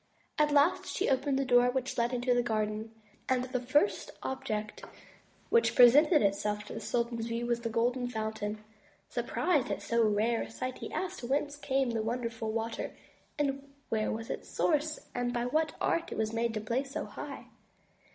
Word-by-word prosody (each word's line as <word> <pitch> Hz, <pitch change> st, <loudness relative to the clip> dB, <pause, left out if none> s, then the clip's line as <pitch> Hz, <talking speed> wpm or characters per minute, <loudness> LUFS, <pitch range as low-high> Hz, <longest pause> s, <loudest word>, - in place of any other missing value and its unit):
At 300 Hz, 0 st, +4 dB
last 290 Hz, +4 st, +3 dB
she -, -, 0 dB
opened 270 Hz, +1 st, +1 dB
a 275 Hz, -, +1 dB
door 245 Hz, -1 st, +5 dB
which 260 Hz, +1 st, -2 dB
led 235 Hz, 0 st, +1 dB
into 250 Hz, 0 st, +1 dB
the 245 Hz, -, +3 dB
garden; 215 Hz, -1 st, -1 dB, 0.4 s
and 255 Hz, -1 st, +2 dB
the 255 Hz, 0 st, -2 dB
first 290 Hz, +11 st, +1 dB
object 220 Hz, -, -3 dB, 0.7 s
which 465 Hz, -, +4 dB
presented 290 Hz, +6 st, +7 dB
itself 210 Hz, +1 st, 0 dB
to -, -, -9 dB
the -, -, -4 dB
sultan's 235 Hz, -1 st, -1 dB
view 235 Hz, +1 st, -2 dB
was 235 Hz, 0 st, 0 dB
the 230 Hz, -, -2 dB
Golden 245 Hz, +2 st, +1 dB
Fountain. 215 Hz, -2 st, -3 dB, 0.5 s
Surprised 300 Hz, -7 st, 0 dB
at -, -, -1 dB
so 235 Hz, 0 st, +1 dB
rare 220 Hz, +2 st, +2 dB
a -, -, -5 dB
sight, 255 Hz, +3 st, -5 dB
he -, -, -6 dB
asked 370 Hz, -5 st, -4 dB
whence 285 Hz, +3 st, 0 dB
came 270 Hz, -3 st, 0 dB
such 225 Hz, -1 st, -1 dB
wonderful 230 Hz, -1 st, -2 dB
water, 225 Hz, +1 st, -3 dB, 0.9 s
where 215 Hz, -1 st, 0 dB
was 225 Hz, +1 st, -4 dB
its -, -, -6 dB
source, 305 Hz, -1 st, 0 dB
and 245 Hz, 0 st, -1 dB
by 240 Hz, 0 st, 0 dB
what 310 Hz, +5 st, 0 dB
art 335 Hz, -, 0 dB
it -, -, -4 dB
was 220 Hz, 0 st, -1 dB
made 230 Hz, 0 st, 0 dB
to 215 Hz, -, -1 dB
play 235 Hz, +5 st, 0 dB
so 280 Hz, +3 st, -5 dB
high. -, -, -8 dB
245 Hz, 180 wpm, -31 LUFS, 225-270 Hz, 0.9 s, presented